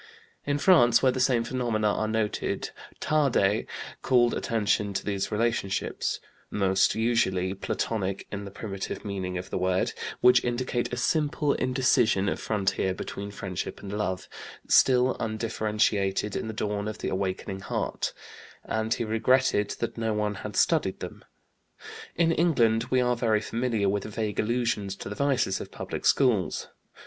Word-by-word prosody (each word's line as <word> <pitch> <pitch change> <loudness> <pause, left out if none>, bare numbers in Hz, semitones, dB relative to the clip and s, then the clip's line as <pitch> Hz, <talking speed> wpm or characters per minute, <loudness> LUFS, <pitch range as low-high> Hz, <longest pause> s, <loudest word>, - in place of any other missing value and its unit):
In 145 0 +1
France, 140 -9 +5
where 130 - +5
the 130 - -3
same 125 -2 +3
phenomena 115 -4 0
are 110 - -1
noted, 110 -1 -1 0.3
Tarde 135 -9 +2 0.3
called 120 -2 +3
attention 105 -2 0
to 95 - -2
these 100 -2 -2
relationships, 110 -3 -1 0.3
"most 95 -1 +2
usually 105 -5 +1
Platonic 100 0 -2
in 100 0 -4
the 100 - -7
primitive 100 +1 -6
meaning 95 -3 -3
of 90 +2 -7
the - - -1
word, 95 0 +1 0.3
which 125 0 +6
indicate 120 0 -1
a 125 - -3
simple 145 +1 +1
indecision 125 -6 +2
of - - -2
frontier 95 -2 0
between 100 +2 -6
friendship 100 -3 -5
and 100 0 -6
love, 95 -3 -2 0.4
still 125 0 +5
undifferentiated 105 -3 0
in - - -3
the 110 - -4
dawn 105 -1 -2
of 110 - -4
the - - -3
awakening 95 0 -3
heart," 95 - -2 0.5
and 110 +1 -1
he - - -2
regretted 115 -1 +2
that 115 0 -4
no 110 -1 0
one 105 0 0
had - - -6
studied - - +2
them. - - -8 0.9
In 165 0 +3
England 120 -10 +3
we 130 0 +2
are 125 0 +2
very 115 -3 +2
familiar 115 -1 -1
with 100 +1 0
vague 110 -1 -3
allusions 110 -4 0
to - - -7
the - - -4
vices 130 -7 +1
of - - -8
public - - -4
schools. 120 -9 +2
110 Hz, 150 wpm, -27 LUFS, 100-125 Hz, 0.9 s, which